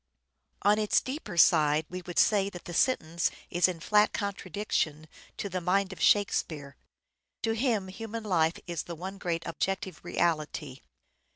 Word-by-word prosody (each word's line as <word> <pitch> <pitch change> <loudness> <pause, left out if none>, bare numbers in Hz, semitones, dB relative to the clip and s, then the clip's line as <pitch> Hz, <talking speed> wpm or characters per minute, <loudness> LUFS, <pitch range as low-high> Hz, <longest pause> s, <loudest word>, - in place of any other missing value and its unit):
On 210 +1 +4
its 210 -1 +3
deeper 260 - -6
side 155 -2 +5
we 185 +1 -6
would 175 - -6
say 200 -2 +4
that 175 -3 -10
the 175 - -7
sentence 170 -8 +1 0.2
is 175 +1 +4
in 180 -3 -4
flat 210 +5 +3
contradiction 195 -6 -2 0.3
to - - -3
the 185 -1 -3
mind 190 +2 +1
of - - -11
Shakespeare. 155 -8 +1 0.7
To 225 - +1
him 225 -4 0
human 225 +4 -6
life 170 -5 +2
is 170 -4 -3
the 170 - -6
one 190 +4 -7
great 170 -2 -2
objective 190 +2 -3
reality. 155 -5 -1
185 Hz, 155 wpm, -29 LUFS, 165-205 Hz, 0.7 s, side